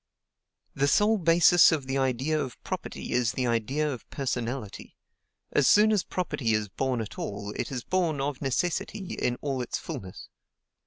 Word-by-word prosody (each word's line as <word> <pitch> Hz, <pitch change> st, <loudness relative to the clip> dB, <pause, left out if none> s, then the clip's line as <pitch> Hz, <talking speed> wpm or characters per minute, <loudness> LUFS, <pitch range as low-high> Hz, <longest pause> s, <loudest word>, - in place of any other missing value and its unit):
"The 140 Hz, +1 st, +1 dB
sole 210 Hz, +9 st, +3 dB
basis 170 Hz, +1 st, +6 dB
of 150 Hz, -4 st, -1 dB
the 135 Hz, +1 st, -1 dB
idea 135 Hz, +4 st, 0 dB
of 130 Hz, -, -8 dB
property -, -, -5 dB
is 120 Hz, -3 st, +1 dB
the 125 Hz, -, -1 dB
idea 120 Hz, +6 st, 0 dB
of 130 Hz, -5 st, -6 dB
personality. 125 Hz, -4 st, -4 dB, 0.6 s
As 140 Hz, -, +3 dB
soon 210 Hz, -, +6 dB
as 210 Hz, -4 st, +2 dB
property 135 Hz, -10 st, -2 dB
is 105 Hz, -1 st, 0 dB
born 125 Hz, +4 st, -1 dB
at 110 Hz, -, -7 dB
all, 100 Hz, 0 st, -4 dB
it -, -, -3 dB
is 125 Hz, -3 st, -4 dB
born, 170 Hz, -6 st, 0 dB
of 140 Hz, 0 st, -3 dB
necessity, 175 Hz, -, -2 dB
in 125 Hz, -1 st, -1 dB
all 135 Hz, -3 st, -1 dB
its 120 Hz, -, -3 dB
fulness. 95 Hz, -1 st, -8 dB
135 Hz, 165 wpm, -27 LUFS, 120-160 Hz, 0.6 s, basis